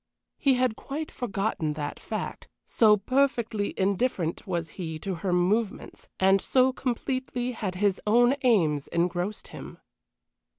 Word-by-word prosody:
He 275 -3 +4
had 250 -3 +1
quite 300 +6 -5
forgotten 195 -8 -2
that 145 -1 -5
fact, - - -5 0.2
so 215 -2 +5
perfectly 235 -2 0
indifferent 190 -3 0
was 170 -3 -2
he 160 -2 -5
to 190 +5 -4
her 190 - -1
movements, 195 +5 -1
and 195 0 +4
so 260 0 +3
completely 255 0 -2
had 205 -6 -4
his 195 0 +1
own 240 +4 +5
aims 165 - +2
engrossed 175 +4 -2
him. - - -9
205 Hz, 130 wpm, -27 LUFS, 180-245 Hz, 0.2 s, so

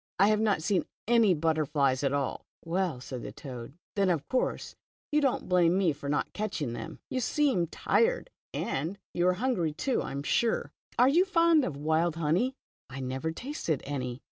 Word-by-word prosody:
I 200 +3 +5
have 215 0 +3
not 205 -7 +1
seen 195 0 +1 0.2
any 225 -5 +5
butterflies 150 -4 +1
at 135 - +2
all." 140 -2 -2 0.2
Well," 170 -4 -1
said 125 -1 -6
the - - -6
toad, 130 +1 -9 0.2
"then 200 -2 +3
of 160 -5 0
course 255 - -1 0.4
you 300 0 +3
don't 270 -3 0
blame 180 -1 +4
me 180 -5 +3
for 140 0 -6
not 145 - -1
catching 190 - -2
them. - - -6
You 260 - 0
seem 255 - +1
tired, - - +1 0.2
and 160 +9 -2 0.2
you 175 +1 +2
are 185 - +4
hungry 180 - 0
too, 260 - 0
I - - -5
am 140 +1 -4
sure. 230 +9 +1 0.3
Are 250 - +6
you 325 +7 +5
fond 335 -5 +4
of 150 - -3
wild 160 +3 +1
honey?" 170 - +1 0.2
" - - -
I 135 +1 -7
never 130 +5 -2
tasted 170 - -3
any." 130 -3 -3
170 Hz, 190 wpm, -29 LUFS, 145-230 Hz, 0.4 s, Are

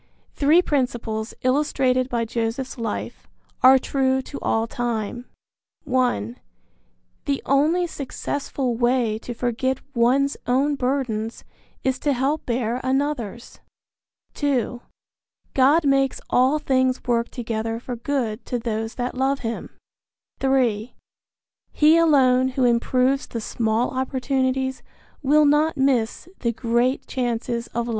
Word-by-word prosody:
Three 310 +5 +4
principles, 240 -6 -2
illustrated 255 -1 +1
by 235 -2 -1
Joseph's 235 +3 -3
life, 225 -2 -5 0.3
are 260 +1 +8
true 265 0 +1
to 280 - -8
all 225 0 +1
time: 240 0 -3 0.6
(1) 250 -2 0 0.9
The 280 -2 0
only 310 +6 +3
successful 275 -4 -3
way 240 -2 +1
to 240 +1 -7
forget 245 +2 -1 0.2
one's 265 +4 +2
own 270 +4 +2
burdens 250 -5 -2 0.4
is 260 -1 0
to 290 - +1
help 275 +4 -1
bear 240 0 -1
another's; 260 -4 -2 0.7
(2) 255 -4 -1 0.7
God 285 +5 +4
makes 275 -1 +2
all 260 +4 +4
things 260 -3 +1
work 235 -2 0
together 225 -2 -3
for 245 0 -6
good 235 -3 -2
to 245 - -1
those 225 -1 -3
that 245 0 -3
love 270 +2 0
him; 230 -1 -4 0.7
(3) 250 -4 +1 0.8
he 310 +2 +5
alone 260 -6 +4
who 260 0 -1
improves 250 +3 +2
the 230 - -5
small 225 +1 0
opportunities 260 0 -1 0.4
will 300 +2 +4
not 295 +2 +3
miss 265 0 +1
the 235 - 0
great 235 +3 0
chances 235 -2 -2
of 235 0 -3
life. - - -4
255 Hz, 120 wpm, -23 LUFS, 235-275 Hz, 0.9 s, are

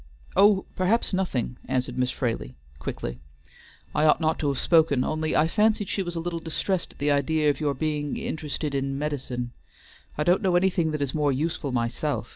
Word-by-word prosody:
"Oh, 200 -1 +5
perhaps 195 +4 +1
nothing," 135 -10 -1
answered 125 -1 -1
Miss 125 0 +1
Fraley, 115 - -3 0.2
quickly. - - -5 0.7
"I 155 - +2
ought 150 - +5
not 160 -1 +1
to 150 - 0
have 140 -2 0
spoken, 160 -6 +4
only 155 0 -1
I 155 - +4
fancied 210 +2 +2
she 200 - -1
was 175 -2 -4
a - - -1
little 170 0 -3
distressed 170 +3 -2
at - - -24
the 145 +1 +1
idea 150 +2 +2
of - - -7
your 145 -2 0
being 150 0 -2
interested 150 -1 -3
in 135 0 -1
medicines. 130 -5 -3 0.7
I 150 - +1
don't 175 +4 +3
know 185 -2 +2
anything 175 -2 +2
that 150 -2 -1
is 135 - -3
more 150 -2 +2
useful 145 0 -2
myself. 120 +2 -1
150 Hz, 190 wpm, -26 LUFS, 135-170 Hz, 0.7 s, Oh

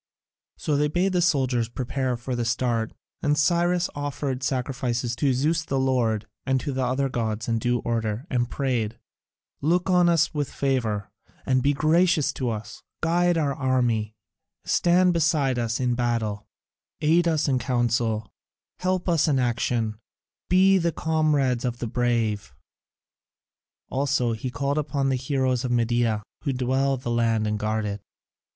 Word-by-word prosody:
So 150 -2 0
they 150 +1 +2
bade 180 +5 0
the 180 - +2
soldiers 130 -8 +1
prepare 125 +1 -2
for 125 +1 -4
the 120 - -1
start, 115 -1 0 0.3
and 145 0 +1
Cyrus 175 +3 +2
offered 145 -2 -3
sacrifices 125 -2 -1
to 140 +2 +2
Zeus 155 +6 +1
the 135 -3 -1
Lord 120 -5 +1 0.2
and 130 0 +1
to 145 - -3
the 130 -1 -1
other 130 +2 0
gods 110 -4 -2
in 115 -1 +1
due 120 +1 0
order, 115 +1 -2
and 120 -2 0
prayed, 120 -5 -1 0.6
"Look 175 +5 +1
on 180 -1 +5
us 165 -1 +2
with 145 -2 -2
favour, 115 -7 -1 0.3
and 130 -1 +2
be 145 +3 +2
gracious 155 0 +2
to 130 -3 -2
us; 110 -1 -6 0.2
guide 175 +1 +2
our 145 -3 +1
army, 120 -5 0 0.5
stand 180 +1 +3
beside 150 -6 +1
us 115 -1 -1
in 125 -1 +1
the - - 0
battle, 115 -4 -1 0.5
aid 165 +3 +3
us 160 -2 +1
in 130 -2 +2
council, 120 -3 0 0.5
help 185 0 -1
us 165 -3 +3
in 145 -3 +2
action, 115 -3 0 0.5
be 190 +1 +5
the 170 -1 +1
comrades 150 -7 +1
of 120 -2 -2
the 120 - -4
brave." 115 - -1 1.4
Also 135 -3 +1
he 110 +4 -4
called 140 +3 -1
upon 140 -2 -1
the 135 - +2
Heroes 130 -1 0
of 125 - -2
Media, 120 -2 +1 0.2
who 140 -3 0
dwell 130 +2 +1
in 130 - -9
the 120 - -3
land 115 -2 +1
and 105 0 -1
guard 110 0 -1
it. 100 0 -4
130 Hz, 160 wpm, -25 LUFS, 120-150 Hz, 1.4 s, on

